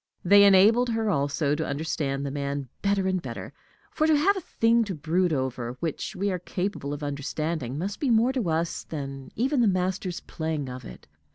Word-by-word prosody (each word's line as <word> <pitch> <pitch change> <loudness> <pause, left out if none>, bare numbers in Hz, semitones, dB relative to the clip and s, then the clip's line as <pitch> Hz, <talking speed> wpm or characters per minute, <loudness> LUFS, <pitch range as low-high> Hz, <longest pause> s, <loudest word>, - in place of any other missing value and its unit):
They 200 +2 +8
enabled 210 +6 +6
her 225 -2 0
also 145 -1 0
to 155 +2 -1
understand 140 -2 -2
the 140 - -3
man 140 -1 -3
better 200 -1 +1
and 185 -1 0
better; - - -7 0.4
for 310 - +1
to 310 -1 +5
have 385 +8 +3
a 380 - -3
thing 230 -6 +2
to 195 -3 -4
brood 170 +4 +1
over 130 -3 -2
which 165 -3 -3
we 200 +2 0
are 180 - -2
capable 180 -4 -3
of 145 +1 -5
understanding 145 -1 -3
must 195 +6 -3
be 280 - 0
more 235 +3 +4
to 240 -10 -1
us 165 +1 -1
than 135 -3 -6
even 260 +3 +1
the 230 - +4
master's 185 -1 -1
playing 155 -4 -3
of 125 -1 -8
it. - - -11
170 Hz, 195 wpm, -26 LUFS, 140-205 Hz, 0.4 s, They